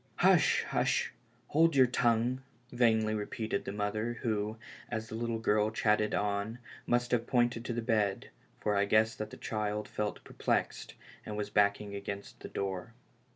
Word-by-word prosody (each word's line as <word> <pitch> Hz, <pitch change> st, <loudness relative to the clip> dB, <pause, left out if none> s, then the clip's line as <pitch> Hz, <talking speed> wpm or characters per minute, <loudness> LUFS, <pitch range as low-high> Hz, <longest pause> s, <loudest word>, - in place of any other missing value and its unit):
" -, -, -35 dB
Hush, -, -, +5 dB
hush. -, -, +1 dB, 0.4 s
Hold 165 Hz, +1 st, +4 dB
your 130 Hz, -1 st, +7 dB
tongue," 120 Hz, +1 st, +1 dB, 0.3 s
vainly 110 Hz, -3 st, +3 dB
repeated 110 Hz, 0 st, -3 dB
the -, -, -3 dB
mother, 110 Hz, +3 st, -2 dB
who, 110 Hz, -1 st, -1 dB, 0.3 s
as 110 Hz, -2 st, -4 dB
the -, -, -8 dB
little 115 Hz, 0 st, -2 dB
girl 105 Hz, -1 st, +2 dB
chattered 105 Hz, -1 st, +1 dB
on, 105 Hz, +2 st, -1 dB, 0.3 s
must 120 Hz, 0 st, +1 dB
have 120 Hz, -1 st, +1 dB
pointed 120 Hz, -2 st, +2 dB
to 120 Hz, -, -2 dB
the 120 Hz, 0 st, -2 dB
bed, 105 Hz, -4 st, 0 dB, 0.3 s
for 105 Hz, -1 st, 0 dB
I 100 Hz, 0 st, +3 dB
guessed 110 Hz, +2 st, +3 dB
that 110 Hz, 0 st, -3 dB
the -, -, -10 dB
child 105 Hz, -1 st, -2 dB
felt 105 Hz, -1 st, -3 dB
perplexed, -, -, -2 dB, 0.3 s
and 105 Hz, -, -5 dB
was 105 Hz, -, -3 dB
backing 100 Hz, 0 st, +2 dB
against 100 Hz, 0 st, -6 dB
the -, -, -8 dB
door. 95 Hz, +3 st, -4 dB
110 Hz, 165 wpm, -32 LUFS, 105-115 Hz, 0.4 s, your